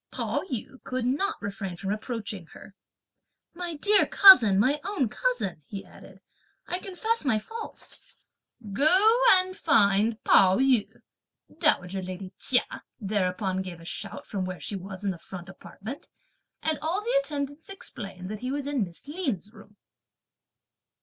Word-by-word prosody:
Pao - - -1
yü 260 +2 -5
could 255 -1 -3
not 340 +12 0
refrain 200 -2 -4
from 195 +2 -2
approaching 215 -5 -5
her. - - -13 0.8
"My 350 -1 -5
dear 405 +7 +3
cousin, 240 - +8
my 265 +9 +3
own 325 - -1
cousin," - - -2
he 195 -1 -7
added, 190 +1 -16 0.4
"I 360 - -3
confess 415 +5 -1
my 255 -6 +2
fault!" 450 - -8 0.7
"Go 310 - +5 0.4
and 370 0 +2
find 210 - +3
Pao 190 -1 +5
yü!" 260 -5 +3 0.7
dowager 190 - +1
lady 185 +1 -7
Chia 250 -1 +1 0.2
thereupon 190 -2 -1
gave 180 -3 -7
a 165 - -13
shout - - -6
from 195 -3 -3
where 185 -1 -5
she 205 - -5
was 190 +1 -7
in 200 - 0
the 175 - -8
front 180 +2 -9
apartment, 215 +6 -10 0.5
and 315 -1 0
all 330 +6 -1
the - - +2
attendants 285 - -5
explained 195 - -7
that 215 - -5
he 255 - -4
was 285 0 -3
in 280 -5 0
Miss 175 +7 -10
Lin's 265 - -3
room. 210 -2 -17
220 Hz, 150 wpm, -27 LUFS, 195-305 Hz, 0.8 s, cousin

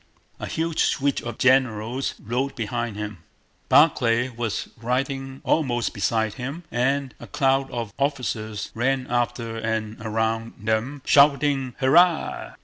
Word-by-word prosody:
A - - -5
huge 165 0 -1
suite 140 -1 +1
of 120 - -6
generals 130 -1 +1
rode 125 +5 -2
behind 120 -1 -3
him. 105 -3 -5 0.5
Barclay 125 -5 +4
was 115 -3 -3
riding 135 +2 -2
almost 120 -7 0
beside 110 +1 0
him, 140 +8 -6
and 135 +2 0
a - - -10
crowd 135 0 +1
of 115 -4 -5
officers 120 -7 -2
ran 130 +2 0
after 120 -1 -1
and 110 -1 -3
around 110 +1 -1
them 110 +6 -2
shouting, 140 -3 +4
"Hurrah!" 165 +5 +3
125 Hz, 125 wpm, -24 LUFS, 115-135 Hz, 0.5 s, Barclay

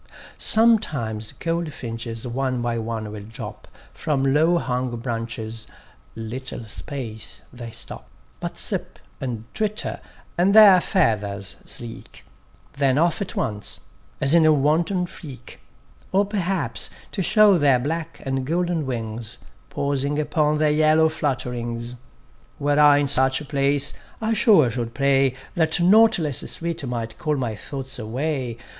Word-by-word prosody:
Sometimes 145 - +2
goldfinches 120 -9 -4
one 130 +1 -1
by 120 -1 -1
one 110 -1 -4
will 105 -1 -7
drop 110 +2 -9 0.3
From 135 -3 0
low 160 +4 +4
hung 125 -5 -2
branches; 115 -2 -4 0.5
little 120 +2 -5
space 110 -1 -6
they 120 -2 -8
stop; - - -4 0.3
But - - -5
sip, - - -1 0.2
and 120 -4 -4
twitter, 215 -1 -2 0.4
and 195 +4 +4
their 200 -4 +9
feathers 105 - 0
sleek: 115 -1 -4 0.5
Then 135 -1 +2
off 170 +6 +2
at 200 - -4
once, 105 -4 -3 0.4
as 140 +2 +3
in 170 -1 +6
a 155 - +6
wanton 160 +6 +2
freak: 135 -8 -11 0.5
Or 195 +2 +3
perhaps, 195 -2 -2 0.2
to 195 - -2
show 205 0 +5
their 140 -3 +4
black, 160 +5 -4
and 135 -1 -1
golden 170 0 -1
wings, 115 -2 -2 0.3
Pausing 140 +1 -1
upon 150 0 +1
their 155 0 +3
yellow 155 +1 +4
flutterings. 120 -5 -3 0.6
Were 145 +1 +1
I 145 -1 +7
in 145 0 +1
such 130 -1 +4
a 150 - -8
place, 140 0 +1 0.3
I 225 0 0
sure 205 - +5
should 115 -1 -4
pray 135 -2 +2 0.2
That 160 -1 +2
nought 220 +6 +6
less 150 -7 0
sweet, 170 -2 -4
might 115 -2 -4
call 150 -1 0
my 120 -5 -2
thoughts 135 +3 -4
away. 125 +1 -3
140 Hz, 135 wpm, -23 LUFS, 120-160 Hz, 0.6 s, their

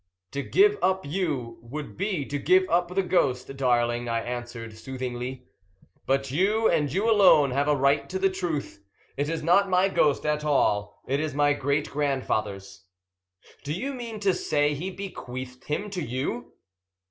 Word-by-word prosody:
"To 140 - -2
give 410 - +3
up 190 -2 +1
you 140 -8 -2
would 140 +6 -7
be 185 -7 -2
to 145 +1 -3
give 185 +5 +4
up 175 +1 +3
the 195 - +2
ghost, 135 -8 0
darling," 120 -2 +1
I 115 0 0
answered 120 -2 -6
soothingly. 125 +1 -5 0.6
"But 135 0 +1
you, 205 +9 +2
and 145 -3 +1
you 200 +9 0
alone, 190 - +6
have 140 +3 +1
a 150 - +4
right 140 +1 +2
to 190 - -2
the 190 0 +2
truth. 165 - -4 0.3
It 145 +2 -1
is 165 -1 -3
not 195 +4 +4
my 185 +1 +3
ghost 150 -6 +2
at 150 0 0
all, 105 -8 +1
it 135 +2 0
is 155 -2 -2
my 145 0 +3
great 145 +1 -1
grandfather's." 105 -9 -2 0.8
"Do 145 +1 -3
you 265 - -3
mean 235 -4 -6
to 195 -2 +3
say 145 -3 +1
he 165 +7 -4
bequeathed 130 -10 -7
him 200 +8 -3
to 185 -3 -3
you?" 130 -1 -4
145 Hz, 170 wpm, -26 LUFS, 125-185 Hz, 0.8 s, alone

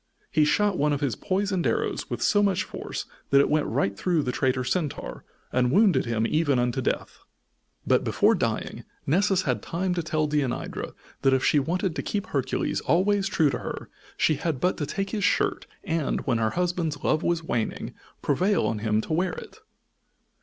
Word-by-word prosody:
He 150 0 +4
shot 205 +6 +2
one 150 +1 +2
of 145 - -2
his 135 -7 0
poisoned 195 -2 0
arrows - - -1
with - - -3
so 205 - +4
much 190 -2 +2
force - - -6 0.2
that 140 - +6
it 140 - +3
went 155 0 +2
right 100 0 0
through 170 - +1
the 125 - -1
traitor 130 0 0
Centaur, 145 +4 -3 0.3
and 125 0 +2
wounded 200 +3 +4
him 115 -1 0
even 150 0 +2
unto 125 +2 0
death. - - -2 0.7
But, - - +3
before - - +3
dying, - - -2 0.2
Nessus 190 +4 +2
had 125 -6 -1
time 180 +2 -2
to 175 - -1
tell 155 -1 0
Deianira 145 -4 -2 0.3
that 135 - +4
if 130 - 0
she 150 - +4
wanted 175 +4 -1
to - - -2
keep 205 0 -2
Hercules 140 - -1
always 195 +6 +2
true 160 -8 +2
to - - -3
her - - -6 0.3
she 155 - +2
had 155 -2 -2
but 180 +7 +1
to 145 - -3
take 195 +5 -3
his 210 -2 -2
shirt, - - +1 0.2
and, 160 -3 -1
when 120 -3 +1
her 110 -1 +2
husband's 175 -4 -1
love 155 - +2
was 170 -1 0
waning, 120 -8 -2 0.3
prevail 185 +8 +2
on 110 - -1
him 110 0 +1
to 155 - -4
wear 175 +2 +1
it. 445 - -10
155 Hz, 190 wpm, -26 LUFS, 135-185 Hz, 0.7 s, that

